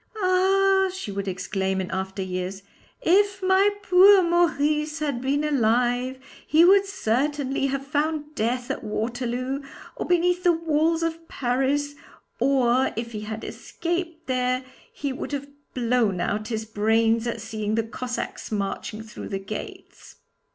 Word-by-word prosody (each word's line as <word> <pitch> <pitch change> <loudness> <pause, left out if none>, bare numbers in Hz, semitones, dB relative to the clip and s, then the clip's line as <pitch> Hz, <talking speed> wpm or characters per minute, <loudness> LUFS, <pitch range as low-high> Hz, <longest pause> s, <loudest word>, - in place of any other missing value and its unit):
'Ah!' 385 +1 +3
she 370 - -6
would 200 0 -4
exclaim 190 +1 -2
in 185 - -4
after 190 +1 -3
years; 185 +1 -4 0.4
'if 395 +2 +3
my 380 +2 +5
poor 380 +1 +7
Maurice 305 -3 +1
had 290 -6 -2
been 280 +3 0
alive 250 -1 +1 0.3
he 320 +2 +6
would 395 +2 +6
certainly 275 - 0
have 275 0 -3
found 300 +1 -1
death 245 0 -1
at - - -4
Waterloo 245 +5 -2 0.3
or - - -4
beneath 355 +1 +2
the 355 - +6
walls 325 0 +1
of 330 0 -3
Paris, 270 +3 0 0.5
or 255 0 +3
if 230 +1 -4
he 215 -2 -5
had 220 +1 -6
escaped 340 -1 -4
there, 255 0 0 0.3
he 280 -2 -4
would 265 - -6
have 280 0 -3 0.3
blown 235 -6 +1
out 210 +4 -1
his 220 -1 -3
brains 225 +2 +2
at 235 -1 -3
seeing 215 -1 -3
the 225 - +1
Cossacks 245 +2 -5
marching 210 +1 -3
through 215 -1 -9
the 195 - -2
gates.' 195 +2 -8
260 Hz, 145 wpm, -25 LUFS, 220-325 Hz, 0.5 s, poor